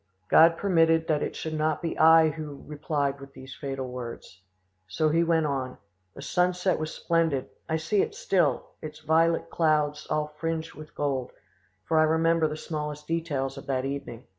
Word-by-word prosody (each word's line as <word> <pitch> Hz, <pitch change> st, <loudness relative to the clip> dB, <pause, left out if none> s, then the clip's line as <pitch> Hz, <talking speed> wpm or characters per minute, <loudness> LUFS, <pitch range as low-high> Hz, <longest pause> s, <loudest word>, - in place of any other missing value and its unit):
God 165 Hz, +1 st, +6 dB
permitted 165 Hz, -4 st, +3 dB
that 150 Hz, -2 st, +2 dB
it -, -, -3 dB
should 160 Hz, -, -5 dB
not 155 Hz, -1 st, 0 dB
be 165 Hz, -, -3 dB
I 160 Hz, 0 st, +6 dB
who 150 Hz, -2 st, -7 dB
replied 145 Hz, -2 st, -2 dB
with 140 Hz, 0 st, -12 dB
these 130 Hz, 0 st, -10 dB
fatal 135 Hz, -2 st, -5 dB
words. 120 Hz, -7 st, -8 dB, 0.5 s
So 155 Hz, +12 st, 0 dB
he 165 Hz, +2 st, +3 dB
went 165 Hz, -1 st, +2 dB
on. 135 Hz, -3 st, -3 dB, 0.4 s
The 140 Hz, -, -9 dB
sunset 180 Hz, +3 st, +1 dB
was 155 Hz, 0 st, -3 dB
splendid: 165 Hz, -6 st, 0 dB, 0.2 s
I 160 Hz, -, +1 dB
see 170 Hz, +6 st, +1 dB
it -, -, -3 dB
still; 165 Hz, -9 st, 0 dB
its 155 Hz, -1 st, -8 dB
violet 165 Hz, +2 st, +2 dB
clouds 150 Hz, -2 st, +1 dB
all 150 Hz, 0 st, -1 dB
fringed 165 Hz, 0 st, -3 dB
with 155 Hz, 0 st, -12 dB
gold, 135 Hz, -3 st, -2 dB, 0.5 s
for 160 Hz, -, +2 dB
I -, -, +6 dB
remember 165 Hz, 0 st, +2 dB
the 150 Hz, 0 st, -5 dB
smallest 150 Hz, -1 st, -5 dB
details 145 Hz, -5 st, -2 dB
of -, -, -14 dB
that 130 Hz, -1 st, -1 dB
evening. 135 Hz, -4 st, -6 dB
155 Hz, 175 wpm, -27 LUFS, 140-165 Hz, 0.5 s, God